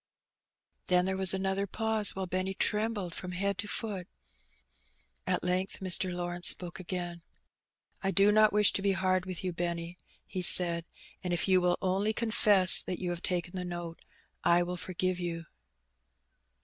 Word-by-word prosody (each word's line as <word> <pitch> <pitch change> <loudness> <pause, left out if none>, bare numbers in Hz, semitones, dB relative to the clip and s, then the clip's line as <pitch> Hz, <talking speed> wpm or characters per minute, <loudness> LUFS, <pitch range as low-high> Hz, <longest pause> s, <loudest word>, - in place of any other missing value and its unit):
Then 180 0 +3
there 190 0 -2
was 190 -1 +6
another 190 +1 -1
pause, 220 +1 -1
while 190 0 -3
Benny 185 +1 -3
trembled 210 -5 0
from 180 0 -7
head 200 +1 -2
to 205 - -3
foot. 200 -5 -4 1.2
At 180 -1 0
length 180 +2 -2
Mr. 185 -1 0
Lawrence 175 0 0
spoke 180 +1 +1
again. 175 -1 -6 0.8
"I 195 - -1
do 195 +1 +4
not 215 0 +4
wish 210 0 +4
to - - -2
be 200 0 +1
hard 185 -1 0
with 185 -1 -6
you, 180 -1 -3
Benny," 170 0 -4 0.3
he 185 - -5
said; 170 -2 +5 0.4
"and 180 -1 -2
if 175 - 0
you 185 -1 +4
will 180 0 +1
only 195 +3 +1
confess 210 -5 +4
that 180 - -5
you 180 -2 -4
have 175 0 -6
taken 175 0 -3
the 180 - -4
note, 175 -1 -6 0.4
I 175 +1 +3
will 180 +1 -5
forgive 185 +1 -3
you." 170 -1 -5
185 Hz, 165 wpm, -30 LUFS, 175-195 Hz, 1.2 s, was